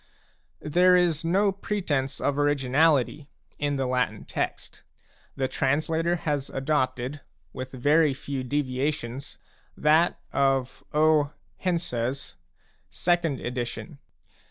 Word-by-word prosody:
There 180 +4 +5
is 175 -3 +2
no 195 +5 +3
pretence 160 -9 -2
of 145 0 0
originality 145 0 +2 0.3
in 145 -1 0
the 135 -1 0
Latin 125 -4 -1
text; - - -4 0.5
the 135 -1 0
translator 160 +6 +1
has 145 -5 -2
adopted, 135 -1 -1 0.3
with 130 0 -6
very 145 +4 +3
few 140 -1 -4
deviations, 135 -1 -2 0.4
that 155 +3 +3
of 135 -2 +1
O. 150 -1 +3 0.2
Hense's 140 -8 -2 0.5
second 170 -6 0
edition. 125 +5 -5
145 Hz, 100 wpm, -26 LUFS, 130-160 Hz, 0.5 s, There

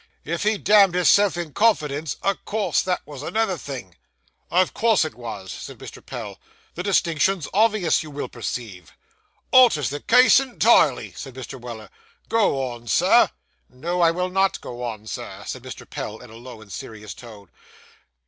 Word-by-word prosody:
'If 165 +2 -3
he 215 +1 +1
damned 200 -3 +5
hisself 185 +1 +4
in 170 -4 -5
confidence, 155 -9 +1
o' 195 - +2
course 210 +2 -1
that 185 -1 -2
was 145 -2 -9
another 220 +4 0
thing.' 125 - -8 0.6
'Of 185 +1 +2
course 225 -7 +3
it 155 - -5
was,' 110 -6 -8
said - - -8
Mr. - - -11
Pell. - - -7 0.3
'The 175 - -5
distinction's 180 -2 +1
obvious, 215 -4 +3
you 155 - -9
will 145 0 -5
perceive.' 110 -7 -7 0.6
'Alters 230 - +5
the 145 - -4
case 250 - +6
entirely,' 225 - +3
said 135 -2 -9
Mr. 130 0 -8
Weller. 115 -3 -9 0.4
'Go 140 -13 +1
on, 120 0 -11
Sir.' - - +4 0.4
No, 170 +7 -3
I 170 - +6
will 180 +2 -1
not 195 +1 +1
go 120 0 -8
on, 110 -3 -5
Sir,' - - -7
said - - -6
Mr. - - -10
Pell, 110 - -6
in 125 -1 -14
a - - -12
low 120 -1 -11
and 105 -2 -15
serious 105 +2 -8
tone. 105 -6 -13
155 Hz, 165 wpm, -23 LUFS, 120-195 Hz, 0.6 s, case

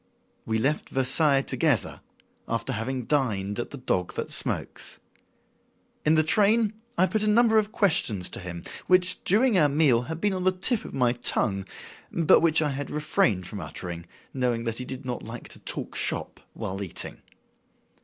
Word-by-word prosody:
We 110 0 0
left 140 +7 -1
Versailles 135 +2 +2
together, 145 - -1 0.5
after - - -2
having 125 +3 -3
dined 105 -8 -1
at 120 - -4
"The 140 - -8
Dog 90 -8 -2
That - - -4
Smokes." - - +1 1.0
In 155 +1 +3
the 155 - +4
train 215 +5 +3 0.2
I 185 - +5
put 215 +2 0
a 215 - +2
number 220 0 +4
of 210 0 -2
questions 155 - +2
to - - -5
him 90 -1 -7 0.2
which, 185 0 +3
during 215 +1 +3
our 150 -2 +4
meal, 140 -5 +3
had 160 +6 -6
been 205 +2 0
on 185 -1 -3
the 185 0 +3
tip 200 +5 +3
of - - -8
my 125 -2 +2
tongue, 100 -5 +1 0.5
but 165 -3 +4
which 160 -1 +3
I 150 - 0
had 140 0 -5
refrained 120 -11 0
from - - -6
uttering, 85 -1 -7 0.3
knowing 125 -3 -1
he 115 +2 -3
did 130 +1 -8
not 125 -1 -4
like 115 +1 -9
to - - -10
talk - - -3
"shop" - - -2 0.2
while 95 +1 -5
eating. 95 -4 -5
140 Hz, 175 wpm, -26 LUFS, 115-180 Hz, 1.0 s, I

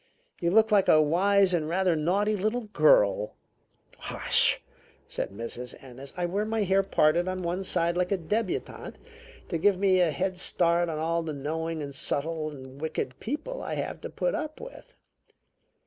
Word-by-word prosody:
You 170 - +1
look 220 +4 +4
like 200 -2 +4
a 155 - +6
wise 185 +5 +3
and 160 -3 0
rather 180 0 +2
naughty 195 +7 +1
little 215 +5 -1
girl." 105 - +3 0.6
"Hush!" - - +3 0.5
said - - -3
Mrs. 115 +4 -6
Ennis. 135 +1 -10
"I 175 - 0
wear 195 +4 -1
my 220 0 -1
hair 195 0 +3
parted 175 -2 +2
on 185 0 -3
one 175 +3 -2
side 170 -2 +1
like 180 +1 0
a 200 - +2
debutante 200 +4 -3 0.5
to 165 - -2
give 200 +2 +3
me 190 -1 +3
a 175 -2 +4
head 180 +5 -2
start 170 -2 +2
on 155 - -3
all 165 +2 0
the 160 -2 -4
knowing 160 +3 -3
and 140 -1 -7
subtle 155 +3 -2
and 135 -1 -11
wicked 155 -5 -4
people 315 - -4
I - - -4
have - - -4
to - - -6
put - - -1
up 310 -1 -4
with. - - -12
175 Hz, 175 wpm, -27 LUFS, 155-200 Hz, 0.6 s, a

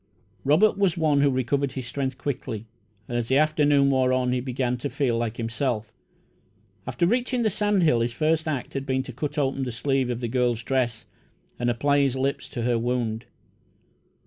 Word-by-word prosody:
Robert 185 +9 +4
was 190 -5 +2
one 150 -3 +3
who 145 - +4
recovered 135 +1 0
his 130 -2 -5
strength 130 +1 -3
quickly, 130 -5 -4 0.4
and 120 - -4
as 115 - -3
the 130 - +3
afternoon 145 -2 +3
wore 130 -1 +2
on 130 -1 +1
he 125 - +1
began 125 0 -1
to 140 +4 -4
feel 130 -5 0
like 115 -1 -2
himself. 115 -1 -2 0.9
After 175 - 0
reaching 245 +4 +1
the 215 - +2
sand 205 -1 +1
hill, 135 -8 +4
his 115 +1 0
first 155 +5 0
act 140 -5 -3
had 135 0 -4
been 130 0 0
to 130 - -9
cut 150 +4 -4
open 135 -1 0
the 130 -2 -2
sleeve 135 +1 0
of 120 -1 -2
the 120 - -2
girl's 120 -1 0
dress 120 -3 -1 0.5
and 120 0 +1
apply 140 +4 +2
his 135 -2 +2
lips 135 +1 -2
to 120 - -4
her 120 -1 +1
wound. 120 -2 -2
130 Hz, 195 wpm, -25 LUFS, 120-145 Hz, 0.9 s, Robert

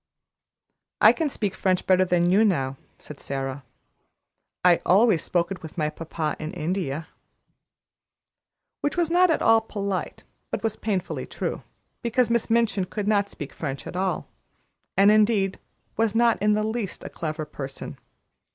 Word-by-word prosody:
"I - - +8
can 320 -3 -1
speak 205 -7 -2
French 185 -2 0
better 185 0 +4
than 175 -1 +2
you, 205 +4 +5
now," 135 -10 +1 0.2
said 150 - -12
Sara; 135 0 -4 1.0
"I 175 -2 +6
always 195 -2 +4
spoke 175 +1 0
it 185 - -5
with 160 +2 -10
my 150 -2 0
papa 160 -1 -3
in 155 0 -5
India." 160 -2 -3 1.7
Which 290 - -1
was 335 -2 +1
not 360 +1 +5
at 325 - +1
all 225 0 +5
polite, 200 -3 -4 0.3
but - - -4
was 220 -2 0
painfully 195 -5 -3
true; - - -4 0.4
because 235 0 +1
Miss 235 -1 +1
Minchin 225 -4 +2
could 205 +2 -4
not 205 -1 +2
speak 145 - -8
French 140 -3 -5
at - - -7
all, 190 0 -1 0.7
and, 200 +2 +7
indeed, 210 -3 +3 0.4
was 225 -1 +1
not 235 -3 +3
in 210 +1 +3
the 215 0 +1
least 220 -2 -3
a - - -6
clever 155 -1 -4
person. 135 -2 -7
195 Hz, 155 wpm, -25 LUFS, 165-220 Hz, 1.7 s, I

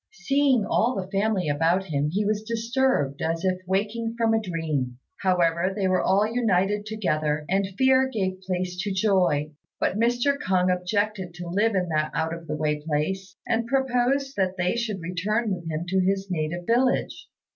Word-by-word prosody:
Seeing 275 -5 +3
all 240 +6 +1
the 190 -1 -5
family 200 -3 +1
about 165 +6 +2
him, 150 -4 -1
he 205 +4 0
was 210 0 0
disturbed 230 - 0
as 165 +2 -1
if 185 0 0
waking 215 +4 -1
from 225 -1 +2
a 225 - +2
dream. 155 - -2 0.2
However 180 -1 +2
they 195 -2 0
were 185 -1 +2
all 195 +3 +3
united 210 -3 +1
together, 155 -8 -1
and 195 +1 +1
fear 265 0 +4
gave 190 -4 -2
place 185 -1 -3
to 205 +1 -2
joy; 185 -7 +2 0.3
but 200 - 0
Mr. 245 +5 +2
K'ung 185 -6 +2
objected 190 0 -2
to 175 0 -7
live 205 +5 +1
in 180 -2 0
that 155 -1 0
out 160 0 0
of 165 -1 -8
the 150 0 -3
way 150 -1 -1
place, 180 +5 -2
and 235 -1 0
proposed 265 +1 +1
that 190 -1 0
they 180 +3 +1
should 220 -5 -2
return 200 +6 -1
with 170 -3 -6
him 160 +2 -3
to 190 +1 +2
his 195 +1 0
native 170 +1 -2
village. 250 +4 +1
190 Hz, 180 wpm, -25 LUFS, 170-225 Hz, 0.3 s, fear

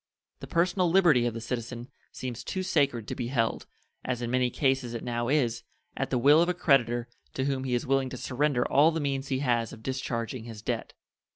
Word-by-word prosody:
The - - -8
personal 180 +1 +2
liberty 165 -10 +4
of 115 - -3
the - - -3
citizen 120 +1 -5 0.2
seems 120 -2 -6
too 185 +7 -3
sacred 140 - +1
to - - -3
be 120 - -3
held, 120 -3 -1 0.4
as 125 -2 -2
in 120 - -2
many 125 -1 +2
cases 130 -2 0
it 115 - -5
now 120 -1 -2
is, 125 -4 +1 0.3
at - - -2
the - - +1
will 145 +6 +6
of 175 - +2
a 180 - 0
creditor 120 -4 +2 0.3
to 130 - -1
whom 135 -1 -1
he 125 -2 0
is 120 - -1
willing 135 0 +1
to 130 - -7
surrender 130 0 0
all 145 +4 +5
the 165 0 -2
means 140 -2 -2
he 135 -1 -1
has 115 -2 +1
of 110 - -12
discharging 125 -2 -3
his 110 -3 -9
debt. - - -3
130 Hz, 215 wpm, -28 LUFS, 120-140 Hz, 0.4 s, will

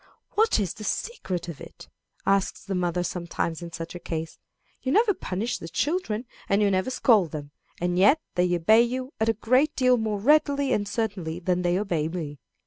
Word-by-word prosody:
"What 440 - +3
is 195 -5 -1
the 215 - -10
secret 195 - -3
of 170 -4 -7
it?" - - -12 0.4
asks 195 -1 +1
the 200 - -4
mother 180 -1 0
sometimes 170 -2 -3
in 170 -1 -7
such 165 0 -6
a 175 - -7
case. 160 -2 -5 0.4
"You 260 - -1
never 430 - +4
punish 215 - -3
the 165 - -7
children, 255 - -1 0.2
and 200 - +3
you 205 -1 +3
never 190 +5 +1
scold 220 -8 +3
them, 145 -1 -7 0.3
and 175 +1 0
yet 210 +12 +6
they 180 0 +2
obey 215 +7 +5
you 255 +3 -2
a 220 +1 +3
great 255 +7 +2
deal 255 -1 +4
more 215 -2 -1
readily 280 +2 +3
and 205 -1 0
certainly 200 -7 -2
than 180 0 0
they 175 -1 +1
do 175 -6 0
me." 155 -5 -5
195 Hz, 190 wpm, -26 LUFS, 175-245 Hz, 0.4 s, yet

